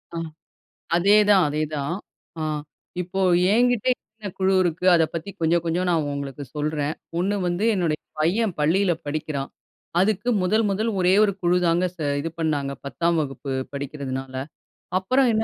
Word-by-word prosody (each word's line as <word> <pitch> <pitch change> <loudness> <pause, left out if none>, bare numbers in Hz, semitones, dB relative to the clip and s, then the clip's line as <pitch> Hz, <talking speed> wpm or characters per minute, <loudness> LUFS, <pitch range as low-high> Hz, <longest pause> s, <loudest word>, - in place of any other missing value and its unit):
ஆ - - -3 0.8
அதேதான் 205 +1 +5
அதேதான். 150 +1 -2 0.4
அ - - -3 0.6
இப்போ 185 +2 -3 0.3
என்கிட்டே 245 +1 +3 0.3
என்ன 210 -2 -6
குழு 190 0 +3
இருக்கு, 175 0 -2
அத 165 - +4
பத்தி 170 +3 -4
கொஞ்சம் 165 +1 +2
கொஞ்சம் 175 +2 0
நான் 160 -4 +1
உங்களுக்கு 140 0 -5
சொல்றேன். 150 0 -1 0.3
ஒண்ணு 195 +3 +1
வந்து 175 +5 0
என்னுடைய 170 -6 0 0.2
பையன் 190 +5 +1
பள்ளியில 180 +5 +3
படிக்கிறான். 145 -2 -3 0.5
அதுக்கு 210 +4 +1
முதல் 215 +5 +2
முதல் 215 +4 0
ஒரே 180 +1 +4
1 205 -2 +2
குழுதாங்க 175 0 +3
ச 175 - -40 0.2
இது 165 - -3
பண்ணாங்க. 145 -4 0
10ஆம் 170 +4 0
வகுப்பு 135 -1 -5 0.2
படிக்கிறதுனால. 135 -2 -5 0.6
அப்புறம் 255 +8 +2
என்ன 220 0 +2
170 Hz, 140 wpm, -24 LUFS, 150-195 Hz, 0.8 s, அதேதான்